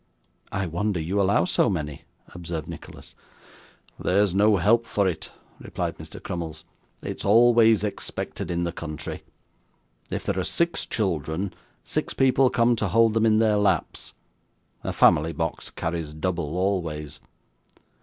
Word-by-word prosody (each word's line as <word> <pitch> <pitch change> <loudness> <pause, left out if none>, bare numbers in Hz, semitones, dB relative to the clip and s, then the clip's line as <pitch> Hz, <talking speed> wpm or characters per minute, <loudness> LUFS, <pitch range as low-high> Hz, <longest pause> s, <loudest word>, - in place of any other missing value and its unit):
'I 95 0 -1
wonder 90 +3 -1
you 90 +6 0
allow 95 -3 +3
so - - +2
many,' 75 -7 -4 0.3
observed 85 -2 -5
Nicholas. - - -10 0.9
'There's 100 0 +2
no 105 +1 +4
help 115 +6 +3
for 100 -2 +1
it,' 90 -4 -4 0.3
replied - - -4
Mr. - - -9
Crummles; 80 -2 -6 0.4
'it's - - -5
always 115 0 +5
expected 105 - -4
in 85 0 -1
the 85 - -1
country. 75 -3 -6 0.9
If - - -3
there 95 - 0
are - - 0
six 170 - 0
children, 90 - -2 0.3
six - - -3
people 135 0 +4
come 120 0 +3
to 105 - 0
hold 115 +4 +4
them 115 0 +3
in 110 -1 +4
their 110 -1 +3
laps. 105 -1 0 0.7
A - - -2
family 80 +2 +4
box 80 +1 -3
carries 80 -2 -4
double 85 -1 -2
always. 80 -6 -2
95 Hz, 140 wpm, -25 LUFS, 80-105 Hz, 0.9 s, always